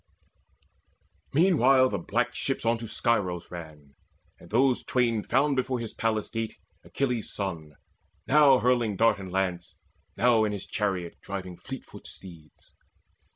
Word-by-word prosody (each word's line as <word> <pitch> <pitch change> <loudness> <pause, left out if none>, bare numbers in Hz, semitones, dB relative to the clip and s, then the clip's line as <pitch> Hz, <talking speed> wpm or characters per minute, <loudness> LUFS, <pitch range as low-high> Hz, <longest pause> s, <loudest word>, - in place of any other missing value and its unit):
Meanwhile 135 -6 +5
the 100 - -2
black 120 +8 -1
ship 135 0 -3
on 115 0 +2
to 115 - -6
Scyros 95 -7 -1
ran; 80 -5 -10 0.5
And 85 - -15
those 125 +3 +2
twain 120 -4 +1
found 135 +6 +2
before 130 -1 -1
his 115 -2 -5
palace 110 -2 -1
gate 115 -1 -4 0.3
Achilles' 125 -5 -2
son, 80 -7 -5 0.5
now 145 -2 +6
hurling 120 -4 +1
dart 115 +1 +3
and 95 -2 -7
lance, 90 -2 -2 0.4
Now 120 -2 +4
in 105 -1 0
his 100 -1 -5
chariot 95 -5 -3
driving 95 -2 -6
fleetfoot 135 +8 -9
steeds. 85 -5 -11
115 Hz, 135 wpm, -27 LUFS, 95-125 Hz, 0.5 s, now